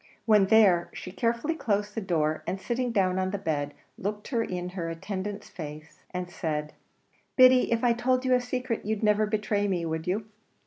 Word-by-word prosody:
When 210 -3 +5
there, 195 -5 +5
she 185 - -7
carefully 235 - 0
closed 210 -8 -1
the 225 - -3
door, 155 -5 0
and 190 - -2
sitting 245 +4 -1
down 190 -4 +2
on 185 0 0
the 200 - -2
bed, 145 -6 -2 0.2
looked 210 +6 -4
in 180 -6 -1
her 180 -2 -4
attendant's 195 +4 -5
face 155 -1 -9
and 180 -1 -4
said, 150 -4 -3 0.6
"Biddy, 255 -1 +6
if 230 0 +1
I 240 -1 +5
told 255 +2 +1
you 255 - +3
a 250 - +4
secret, 245 -1 -3
you'd 215 +1 -2
never 210 0 +3
betray 210 -1 0
me, 175 -4 -1
would 160 0 -3
you?" 205 +4 -1
205 Hz, 185 wpm, -28 LUFS, 180-230 Hz, 0.6 s, Biddy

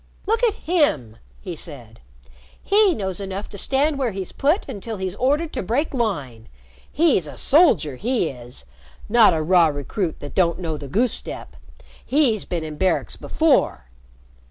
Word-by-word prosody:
"Look 450 +4 0
at 445 -3 +3
him!" 220 - 0 0.2
he 180 -4 -6
said. 125 -9 -8 0.6
"He 405 -3 +4
knows 190 -5 -3
enough 195 0 -5
to 200 - -9
stand 280 +5 +1
where 260 -3 +1
he's 190 -1 -5
put 305 +9 0
until 225 -3 -6
he's 190 -1 -3
ordered 290 - 0
to - - -2
break 250 - -1
line. 145 - -3 0.4
He's 290 - +2
a 145 - -10
soldier, 210 - +3
he 235 - 0
is 120 - -11 0.4
not 220 -5 +5
a 155 - -1
raw 175 0 +5
recruit 155 - -3
that 145 - -8
don't 170 -3 +2
know 165 -4 -3
the 145 -2 -8
goose 225 - +1
step. - - -4 0.5
He's 260 -8 +2
been 170 -2 -3
in 155 -1 -7
barracks 190 +2 0
before." 310 - +1
195 Hz, 160 wpm, -22 LUFS, -, 0.6 s, not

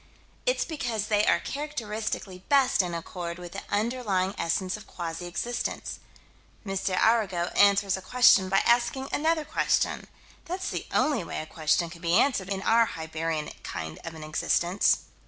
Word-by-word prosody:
It's - - +2
because 235 - -3
they 210 -1 +3
are - - +4
characteristically 220 -9 -4
best 275 -7 +4
in 175 -2 -3
accord 170 0 -5
with 175 -1 -9
the 195 - -6
underlying 205 -4 0
essence 185 +2 -1
of 215 - -11
quasi 170 0 -5
existence. 240 +7 -3 0.7
M. 195 -1 -3 0.2
Arago 195 -7 +2
answers 200 -1 +4
a - - -8
question 225 -2 +5
by 195 - +3
asking 245 +3 +2
another 315 +1 +1
question. - - 0 0.4
That's 370 +2 -3
the - - -4
only 290 -10 +2
way - - -5
a 155 - -5
question 160 +2 0
can 170 -1 -11
be 170 0 +1
answered 200 -10 +1
in 195 -1 -2
our 230 0 +4
Hibernian 160 0 -3
kind 80 -2 -6
of 165 0 -7
an 155 - -8
existence. 175 +4 +2
195 Hz, 155 wpm, -27 LUFS, 170-240 Hz, 0.7 s, question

